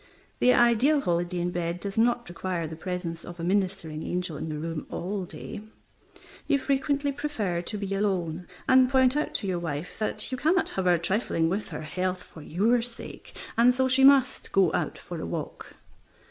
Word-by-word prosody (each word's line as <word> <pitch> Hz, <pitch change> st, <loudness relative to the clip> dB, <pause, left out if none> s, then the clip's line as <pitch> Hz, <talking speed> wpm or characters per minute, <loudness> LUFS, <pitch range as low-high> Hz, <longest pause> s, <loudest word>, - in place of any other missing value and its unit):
The 250 Hz, -, +5 dB
ideal 245 Hz, +5 st, +4 dB
holiday 175 Hz, -2 st, 0 dB
in 175 Hz, 0 st, -1 dB
bed 175 Hz, 0 st, -2 dB
does 200 Hz, +1 st, -5 dB
not 240 Hz, +1 st, +2 dB
require 175 Hz, -1 st, -3 dB
the 160 Hz, 0 st, -6 dB
presence 170 Hz, -1 st, -4 dB
of 175 Hz, 0 st, -9 dB
a -, -, -4 dB
ministering 185 Hz, -4 st, 0 dB
angel 180 Hz, -2 st, -2 dB
in 160 Hz, -, -5 dB
the 155 Hz, -, -3 dB
room 160 Hz, 0 st, -4 dB
all 190 Hz, +1 st, -3 dB
day. 190 Hz, -, -8 dB, 0.9 s
You 280 Hz, -, +4 dB
frequently 280 Hz, +1 st, 0 dB
prefer 220 Hz, -12 st, -2 dB
to 210 Hz, +5 st, -5 dB
be 200 Hz, -1 st, -3 dB
alone, 180 Hz, -4 st, -1 dB, 0.2 s
and 260 Hz, -1 st, +6 dB
point 260 Hz, 0 st, +4 dB
out 300 Hz, -, -1 dB
to 200 Hz, -, -1 dB
your 180 Hz, -2 st, -1 dB
wife 160 Hz, 0 st, -5 dB
that 215 Hz, +2 st, -2 dB
you 255 Hz, -, -3 dB
cannot 330 Hz, +7 st, +2 dB
have 190 Hz, -, -2 dB
her 175 Hz, -1 st, +5 dB
trifling 170 Hz, -2 st, 0 dB
with 200 Hz, +4 st, -2 dB
her -, -, -6 dB
health 180 Hz, +3 st, -2 dB
for 160 Hz, -, -13 dB
your 215 Hz, +11 st, +2 dB
sake, 235 Hz, 0 st, -7 dB, 0.2 s
and 245 Hz, +2 st, +5 dB
so 260 Hz, 0 st, +2 dB
she 260 Hz, +1 st, +3 dB
must 275 Hz, -1 st, +5 dB
go 190 Hz, -5 st, +3 dB
out -, -, -1 dB
for -, -, -7 dB
a -, -, -4 dB
walk. -, -, -6 dB
190 Hz, 190 wpm, -27 LUFS, 175-245 Hz, 0.9 s, and